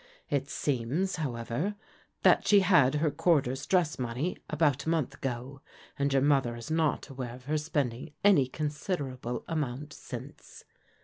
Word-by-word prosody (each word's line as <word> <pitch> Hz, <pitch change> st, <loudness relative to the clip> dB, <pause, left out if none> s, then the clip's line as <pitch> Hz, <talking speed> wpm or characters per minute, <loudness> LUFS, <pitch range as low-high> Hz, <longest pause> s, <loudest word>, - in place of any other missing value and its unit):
It 140 Hz, -1 st, 0 dB
seems, 145 Hz, +9 st, -1 dB
however, 140 Hz, -, -2 dB, 0.5 s
that -, -, +5 dB
she 205 Hz, -1 st, +7 dB
had 170 Hz, -8 st, +5 dB
her 150 Hz, 0 st, +2 dB
quarter's 145 Hz, -4 st, +1 dB
dress 175 Hz, -6 st, +2 dB
money 125 Hz, +8 st, -2 dB
about 150 Hz, -2 st, +1 dB
a -, -, +2 dB
month 160 Hz, -6 st, 0 dB
ago, 135 Hz, +2 st, -5 dB, 0.4 s
and 140 Hz, 0 st, +1 dB
your 135 Hz, -1 st, +3 dB
mother 135 Hz, -5 st, +3 dB
is 120 Hz, +6 st, -7 dB
not 160 Hz, -2 st, +1 dB
aware 125 Hz, -3 st, -5 dB
of 125 Hz, 0 st, -15 dB
her 155 Hz, +2 st, 0 dB
spending 145 Hz, -3 st, -2 dB
any 185 Hz, -11 st, +6 dB
considerable 145 Hz, -4 st, -3 dB
amount 145 Hz, -2 st, -3 dB
since. -, -, -9 dB
145 Hz, 145 wpm, -30 LUFS, 130-160 Hz, 0.5 s, she